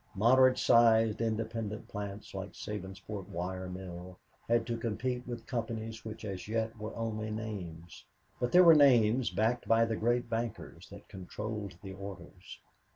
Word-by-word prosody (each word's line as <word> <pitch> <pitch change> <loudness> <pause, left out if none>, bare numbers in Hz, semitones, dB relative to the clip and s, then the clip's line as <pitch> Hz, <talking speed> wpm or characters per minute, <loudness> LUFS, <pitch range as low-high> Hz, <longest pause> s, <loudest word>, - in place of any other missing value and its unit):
Moderate 130 +5 +5
sized, 115 -2 +4
independent 110 -1 -3
plants, 100 0 -7
like 95 +1 -6
the - - -18
Sabinsport 100 -1 -6
wire 95 0 -4
mill, 90 0 -8 0.3
had 115 -1 +2
to 120 - -2
compete 120 +2 -3
with 120 -1 -6
companies 115 -2 -4
which 110 0 -7
as 95 -2 -5
yet 110 +1 -1
were 110 +1 -6
only 110 -1 -3
names 95 -7 -6 0.4
but 125 - -1
they 180 - +8
were 170 -2 +9
names 125 -5 +5
backed 110 +6 0
by 115 0 +5
the 115 -1 -1
great 120 +2 +1
bankers 115 -1 -5
that - - -12
controlled 100 0 -6
the 95 -1 -7
orders. 95 -1 -10
110 Hz, 155 wpm, -32 LUFS, 100-115 Hz, 0.4 s, were